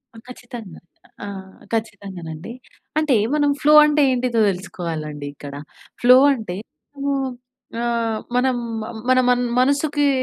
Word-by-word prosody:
ఆ! -, -, -12 dB
ఖచ్చితంగా. 240 Hz, -6 st, -10 dB, 0.5 s
ఆహ్, 190 Hz, -1 st, -9 dB
ఖచ్చితంగానండి 195 Hz, -5 st, -5 dB, 0.5 s
అంటే 305 Hz, -4 st, +2 dB, 0.2 s
మనం 290 Hz, -1 st, +2 dB
ఫ్లో 300 Hz, +1 st, +5 dB
అంటే 300 Hz, 0 st, +2 dB
ఏంటిదో 245 Hz, -2 st, 0 dB
దెలుసుకోవాలండి 165 Hz, -6 st, -5 dB
ఇక్కడ. 145 Hz, 0 st, -10 dB, 0.5 s
ఫ్లో 250 Hz, +1 st, +8 dB, 0.2 s
అంటే 215 Hz, -8 st, -5 dB, 0.5 s
హ్మ్, 275 Hz, -1 st, 0 dB, 0.5 s
ఆహ్, 230 Hz, -2 st, -1 dB, 0.2 s
మనం 255 Hz, 0 st, +2 dB, 0.3 s
మ -, -, -5 dB, 0.2 s
మన 255 Hz, 0 st, +5 dB
మన్ 245 Hz, 0 st, +3 dB, 0.2 s
మనసుకి 285 Hz, +2 st, +2 dB
235 Hz, 115 wpm, -21 LUFS, 190-260 Hz, 0.5 s, ఫ్లో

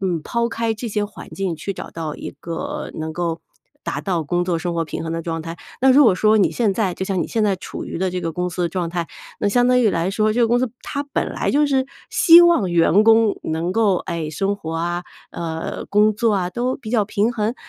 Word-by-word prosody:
嗯， 180 Hz, -4 st, -1 dB
抛 235 Hz, 0 st, -1 dB
开 230 Hz, -1 st, -1 dB
这 235 Hz, +2 st, -5 dB
些 210 Hz, -1 st, -1 dB
环 205 Hz, -, -10 dB
境 190 Hz, -3 st, -2 dB
去 195 Hz, +5 st, -5 dB
找 -, -, -8 dB
到 160 Hz, -2 st, -5 dB
一 -, -, -6 dB
个 285 Hz, -, -5 dB
能 160 Hz, 0 st, -4 dB
够 170 Hz, 0 st, -2 dB, 0.4 s
达 -, -, -3 dB
到 175 Hz, -5 st, -1 dB
工 175 Hz, +4 st, -1 dB
作 175 Hz, -2 st, 0 dB
生 175 Hz, +1 st, -3 dB
活 165 Hz, -1 st, 0 dB
平 -, -, -5 dB
衡 165 Hz, -, -4 dB
的 165 Hz, 0 st, -3 dB
状 165 Hz, 0 st, -3 dB
态。 165 Hz, +1 st, -7 dB, 0.2 s
那 265 Hz, +1 st, +5 dB
如 280 Hz, +3 st, +7 dB
果 215 Hz, -6 st, +5 dB
说 215 Hz, +3 st, +3 dB
你 200 Hz, -, +3 dB
现 220 Hz, -5 st, +1 dB
在 200 Hz, -5 st, 0 dB
就 -, -, -6 dB
像 190 Hz, -2 st, -1 dB
你 -, -, -4 dB
现 225 Hz, -, -1 dB
在 200 Hz, -3 st, +2 dB
处 -, -, -7 dB
于 -, -, -5 dB
的 185 Hz, 0 st, 0 dB
这 180 Hz, 0 st, -3 dB
个 165 Hz, -, -2 dB
公 180 Hz, +2 st, -2 dB
司 180 Hz, -, -5 dB
的 170 Hz, -, +1 dB
状 175 Hz, 0 st, -2 dB
态， 170 Hz, -1 st, -2 dB, 0.3 s
那 205 Hz, -, +1 dB
相 245 Hz, +3 st, +3 dB
当 250 Hz, 0 st, +4 dB
于 230 Hz, -, +4 dB
来 170 Hz, +2 st, 0 dB
说 215 Hz, +1 st, +1 dB
这 -, -, -1 dB
个 235 Hz, -, +5 dB
公 240 Hz, +2 st, +2 dB
司 255 Hz, -2 st, -1 dB
它 285 Hz, -, -3 dB
本 285 Hz, -, -3 dB
来 -, -, -1 dB
就 295 Hz, +1 st, +3 dB
是 265 Hz, -2 st, +1 dB, 0.2 s
希 335 Hz, -1 st, +8 dB
望 335 Hz, -, +3 dB
员 170 Hz, +3 st, +4 dB
工 225 Hz, -1 st, +4 dB
能 165 Hz, +3 st, -2 dB
够， 210 Hz, -4 st, +3 dB
诶， 170 Hz, -3 st, -4 dB
生 195 Hz, +6 st, -1 dB
活 165 Hz, -5 st, -6 dB
啊， 175 Hz, +1 st, -2 dB, 0.3 s
呃， 165 Hz, -1 st, -4 dB
工 210 Hz, +1 st, +3 dB
作 225 Hz, 0 st, +1 dB
啊 180 Hz, -2 st, -1 dB
都 245 Hz, +5 st, -1 dB
比 220 Hz, -5 st, -9 dB
较 225 Hz, -3 st, +2 dB
平 215 Hz, +3 st, 0 dB
衡。 220 Hz, +1 st, -1 dB
195 Hz, 275 characters per minute, -21 LUFS, 170-230 Hz, 0.4 s, 希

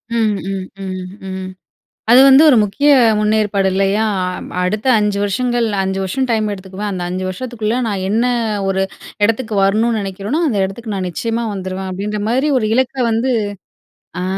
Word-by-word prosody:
ம், 220 Hz, -3 st, +2 dB
ம், 190 Hz, -1 st, -3 dB, 0.2 s
ம், 185 Hz, -1 st, -5 dB, 0.2 s
ம். 190 Hz, 0 st, -5 dB, 0.6 s
அது 245 Hz, -, +8 dB
வந்து 270 Hz, +1 st, +8 dB
ஒரு 250 Hz, -, +5 dB
முக்கிய 280 Hz, +9 st, +1 dB, 0.3 s
முன்னேற்பாடு 210 Hz, -2 st, +1 dB
இல்லயா? 195 Hz, +3 st, +1 dB, 0.2 s
அ 180 Hz, -, -1 dB, 0.3 s
அடுத்த 215 Hz, +7 st, -1 dB
5 210 Hz, -1 st, 0 dB
வருஷங்கள், 240 Hz, +3 st, 0 dB, 0.2 s
5 190 Hz, 0 st, -2 dB
வருஷம் 260 Hz, +8 st, -1 dB
டைம் 215 Hz, -2 st, +1 dB
எடுத்துக்குவேன். 195 Hz, +1 st, -6 dB
அந்த 180 Hz, -2 st, -3 dB
5 185 Hz, +1 st, -3 dB
வருஷத்துக்குள்ள 230 Hz, +2 st, -3 dB
நான் 195 Hz, -3 st, -2 dB
என்ன 225 Hz, +4 st, +2 dB, 0.4 s
ஒரு 190 Hz, 0 st, +1 dB, 0.4 s
இடத்துக்கு 225 Hz, 0 st, -1 dB
வரணுனு 220 Hz, +3 st, +2 dB
நினைக்கிறேனோ, 200 Hz, -, -3 dB
அந்த 225 Hz, -, 0 dB
இடத்துக்கு 215 Hz, +3 st, -6 dB
நான் 185 Hz, -1 st, -2 dB
நிச்சயமா 230 Hz, +5 st, -2 dB
வந்துருவேன். 190 Hz, 0 st, -5 dB
அப்டீன்ற 205 Hz, +3 st, -3 dB
மாதிரி 265 Hz, +6 st, +1 dB
ஒரு 215 Hz, -, -1 dB
இலக்க 260 Hz, +1 st, +1 dB, 0.2 s
வந்து 235 Hz, +4 st, +1 dB, 0.9 s
அ. -, -, -2 dB
210 Hz, 160 wpm, -17 LUFS, 190-235 Hz, 0.9 s, அது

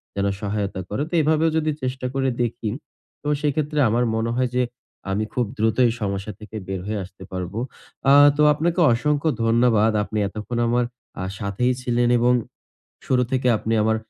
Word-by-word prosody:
যেন 100 Hz, 0 st, 0 dB, 0.2 s
সহায়তা 100 Hz, -2 st, -2 dB
করে। 105 Hz, -, -2 dB
তো -, -, -15 dB
এভাবেও 155 Hz, +1 st, +3 dB
যদি 155 Hz, -1 st, +1 dB
চেষ্টা 130 Hz, 0 st, -3 dB
করে 135 Hz, -1 st, +1 dB
দেখি। 120 Hz, -1 st, -2 dB, 0.5 s
তো 145 Hz, -, -7 dB
সেক্ষেত্রে 150 Hz, 0 st, 0 dB
আমার 120 Hz, +3 st, +2 dB
মনে 110 Hz, +1 st, -1 dB
হয় 130 Hz, -1 st, +1 dB
যে 125 Hz, -, +3 dB, 0.5 s
আমি 100 Hz, +3 st, 0 dB
খুব 125 Hz, -, +1 dB
দ্রুত 110 Hz, +1 st, +1 dB
এই 120 Hz, -, +3 dB
সমস্যা 100 Hz, 0 st, -2 dB
থেকে 110 Hz, +1 st, -11 dB
বের 95 Hz, -1 st, -3 dB
হয়ে 105 Hz, -1 st, -2 dB
আসতে 95 Hz, +2 st, -12 dB
পারবো। 95 Hz, +3 st, -4 dB, 0.5 s
আ -, -, +8 dB, 0.2 s
তো -, -, +3 dB
আপনাকে 165 Hz, +4 st, 0 dB
অসংখ্য 150 Hz, +5 st, +1 dB, 0.2 s
ধন্যবাদ, 115 Hz, -1 st, +4 dB
আপনি 110 Hz, -, -5 dB
এতক্ষণ 105 Hz, +4 st, -5 dB
আমার 120 Hz, +1 st, +2 dB, 0.4 s
আ -, -, -2 dB, 0.2 s
সাথেই 110 Hz, +5 st, 0 dB
ছিলেন 120 Hz, -1 st, +1 dB
এবং 120 Hz, +1 st, +3 dB, 0.7 s
শুরু 125 Hz, -1 st, +2 dB
থেকে 130 Hz, -1 st, +1 dB
আপনি 110 Hz, +1 st, -3 dB
আমার 110 Hz, +1 st, +2 dB
120 Hz, 175 wpm, -23 LUFS, 105-130 Hz, 0.7 s, আ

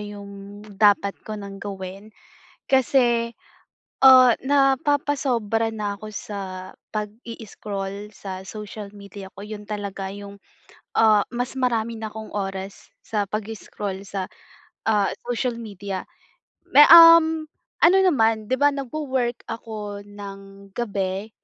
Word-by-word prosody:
yung 205 Hz, 0 st, -10 dB
dapat 205 Hz, -1 st, +3 dB
ko 215 Hz, 0 st, -7 dB
nang 200 Hz, -1 st, -8 dB
gawin 195 Hz, 0 st, -7 dB, 0.6 s
kasi, 240 Hz, -3 st, +2 dB, 0.7 s
ah, 255 Hz, -2 st, +9 dB
napapasobra 270 Hz, -5 st, +1 dB
na 205 Hz, -2 st, -3 dB
ako 215 Hz, -, -8 dB
sa 205 Hz, 0 st, -6 dB, 0.5 s
pag-i-scroll 210 Hz, -2 st, -6 dB
sa 190 Hz, -2 st, -7 dB
social 210 Hz, +1 st, -8 dB
media 200 Hz, -1 st, -10 dB
ko, 200 Hz, -, -8 dB
yun 210 Hz, 0 st, -8 dB
talaga 200 Hz, -2 st, -4 dB
yung, 200 Hz, 0 st, -10 dB, 0.6 s
ah, 215 Hz, -2 st, +5 dB
mas 245 Hz, +1 st, -3 dB
marami 235 Hz, -3 st, 0 dB
na 220 Hz, -1 st, -5 dB
akong 220 Hz, 0 st, -9 dB
oras 195 Hz, -1 st, -5 dB, 0.2 s
sa 210 Hz, -2 st, 0 dB
pag-i-scroll 210 Hz, -2 st, -5 dB
sa, 195 Hz, -1 st, -4 dB, 0.6 s
ah, 210 Hz, -3 st, +2 dB, 0.2 s
social 245 Hz, 0 st, -1 dB
media. 200 Hz, -4 st, -6 dB, 0.7 s
May 295 Hz, -, +9 dB
um, 330 Hz, -1 st, +9 dB, 0.4 s
ano 360 Hz, +3 st, +7 dB
naman, 225 Hz, -, +2 dB
'di 260 Hz, -, +1 dB
ba 290 Hz, 0 st, +5 dB
nagwo-work 260 Hz, -3 st, -3 dB
ako 210 Hz, -3 st, -6 dB
ng 200 Hz, -1 st, -11 dB
gabi 200 Hz, -3 st, -2 dB
210 Hz, 115 wpm, -23 LUFS, 200-240 Hz, 0.7 s, ah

